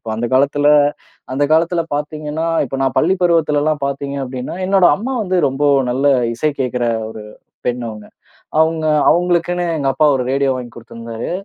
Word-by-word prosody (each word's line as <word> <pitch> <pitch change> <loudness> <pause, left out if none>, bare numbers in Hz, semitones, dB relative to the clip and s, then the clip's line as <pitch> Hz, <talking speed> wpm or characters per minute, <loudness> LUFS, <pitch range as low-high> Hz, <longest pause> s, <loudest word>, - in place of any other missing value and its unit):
இப்ப 115 - -7
அந்த 120 +2 -2
காலத்துல 145 +2 +3 0.6
அந்த 140 +2 +1
காலத்துல 165 +2 +2
பார்த்தீங்கன்னா, 150 +1 -4 0.2
இப்ப 135 - -5
நான் 135 - 0
பள்ளிப் 185 +3 +2
பருவத்துல 165 -4 +2
எல்லாம் 155 -1 0
பார்த்தீங்க 140 0 -3
அப்டின்னா 130 -1 -5
என்னோட 190 -1 +4
அம்மா 255 +6 -4
வந்து 185 -2 -1
ரொம்ப 135 +2 -1 0.3
நல்ல 135 +3 0 0.3
இசை 155 +6 0
கேட்கிற 125 -1 -1 0.3
ஒரு 110 -1 -9 0.4
பெண் 125 0 -1
அவங்க. 105 -1 -9 0.5
அவங்க 160 0 +1 0.2
அவங்களுக்குனு 175 +1 +1
எங்க 135 -1 0
அப்பா 155 - +3
ஒரு 125 - -2
ரேடியோ 135 -1 +1
வாங்கி 120 -2 -8
குடுத்திருந்தாரு. 115 0 -7
145 Hz, 165 wpm, -17 LUFS, 125-165 Hz, 0.6 s, என்னோட